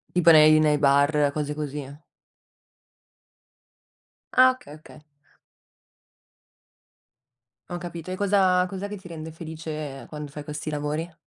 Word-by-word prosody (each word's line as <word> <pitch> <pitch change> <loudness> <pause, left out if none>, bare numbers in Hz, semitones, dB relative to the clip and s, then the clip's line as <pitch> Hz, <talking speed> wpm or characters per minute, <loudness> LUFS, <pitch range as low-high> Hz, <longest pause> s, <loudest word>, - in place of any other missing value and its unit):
Tipo 175 -1 +5
nei 155 0 +7
nei 150 -1 +3
bar, 145 +1 +3
cose 150 0 -3
così. 145 -2 -5 2.5
Ah, 255 0 +7
okay. 255 - -14
Okay. 155 -1 -15 2.7
Ho 175 - -5
capito. 175 0 -8
E 185 - -3
cosa 190 -2 +3
cos'è 195 +1 -5
che 210 - -6
ti 185 -2 -12
rende 160 -1 -8
felice 155 -3 -7
quando 150 -1 -7
fai 145 +1 -8
questi 150 +1 -6
lavori? 150 +3 -3
155 Hz, 115 wpm, -25 LUFS, 150-180 Hz, 2.7 s, nei